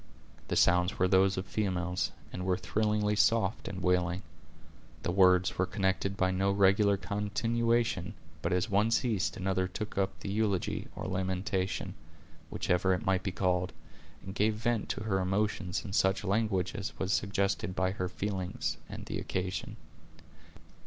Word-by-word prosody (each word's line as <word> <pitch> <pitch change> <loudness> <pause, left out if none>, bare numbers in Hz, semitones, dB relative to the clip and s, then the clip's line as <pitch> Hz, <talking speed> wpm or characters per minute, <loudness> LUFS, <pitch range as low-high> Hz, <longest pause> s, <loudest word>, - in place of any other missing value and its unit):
The - - -1
sounds 90 +4 +3
were 95 - +3
those 95 +1 +4
of 95 - -2
females, 90 -4 -1 0.2
and 90 - -4
were 90 -1 +1
thrillingly 105 +2 0
soft 110 -2 +2
and 95 -1 -5
wailing. 90 0 +1 0.8
The - - 0
words 90 -1 +4
were 95 - +2
connected 95 0 0
by 95 0 +2
no 95 +1 +1
regular 100 +1 +4
continuation, 110 0 0 0.3
but 85 - -1
as 90 +2 +1
one 105 +1 +2
ceased 115 -4 0
another 95 0 0
took 105 +2 -4
up 95 0 -1
the 100 - -4
eulogy, 100 -3 0
or - - -5
lamentation, 95 0 -2 0.6
whichever 95 +1 +1
it 90 - -6
might 95 -1 +2
be 95 - -2
called, 90 0 0 0.5
and 95 - -6
gave 105 +2 +2
vent 115 0 -1
to 125 - -3
her 100 -3 0
emotions 95 -1 -1
in 95 - -6
such 95 0 +2
language 95 -3 0
as 100 - -5
was 95 +2 0
suggested 100 -2 0
by 95 0 +1
her 90 -2 -3
feelings 90 -5 -3
and - - -7
the - - -3
occasion. 95 0 -3
95 Hz, 155 wpm, -31 LUFS, 90-105 Hz, 0.8 s, those